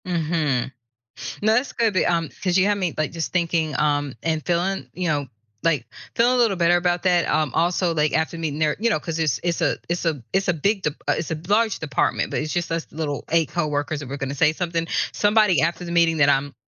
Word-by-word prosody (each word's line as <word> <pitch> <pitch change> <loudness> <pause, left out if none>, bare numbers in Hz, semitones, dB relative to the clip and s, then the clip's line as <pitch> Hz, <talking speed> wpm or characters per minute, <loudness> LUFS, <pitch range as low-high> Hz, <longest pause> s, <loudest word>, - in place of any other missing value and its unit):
Mhm. 155 -7 0 0.7
No, 215 +1 +3
that's 250 +5 0
good, 225 -3 +1
the, 185 - +2
um 165 -2 +1
'cause 180 -2 +2
you 190 - +4
have 205 0 +2
me, 180 -4 -1
like, 155 - -1
just 165 -1 -4
thinking, 165 -4 0
um, 145 -2 +1
and 160 -2 -1
feeling, 180 +3 -1
you 180 -1 -2
know, 145 -3 0 0.4
like, 160 -5 +1 0.3
feeling 245 +2 +4
a - - +1
little 230 -5 +3
better 170 0 +4
about 175 0 0
that, 180 -2 +3
um, 155 -1 +1
also, 175 0 +1
like, 150 -1 +1
after 160 +1 0
meeting 155 -2 -3
there 155 -1 +2
you 235 +2 +2
know, 210 - +1
'cause 165 +1 -4
it's 155 -5 +1
it's 170 -1 -1
a - - +1
it's 175 0 -2
a 155 -5 0
it's 195 +1 +1
a 180 - +3
big 195 +5 0
dep 150 - 0
uh, - - +3
it's 160 - -4
a 160 - -2
large 215 +1 +2
department, 145 -4 0
but - - -1
it's 155 0 -3
just 175 -1 -2
us 165 0 -1
little 150 -2 -4
8 165 -3 +2
coworkers 150 -2 -2
that 135 - -8
were 140 - -4
gonna 135 0 -4
say 155 +2 +3
something. 165 -1 -2 0.2
Somebody 205 -7 +3
after 170 +2 -1
the 170 - -6
meeting 170 -1 +3
that 145 -2 +4
I'm 140 0 +1
165 Hz, 235 wpm, -23 LUFS, 150-180 Hz, 0.7 s, you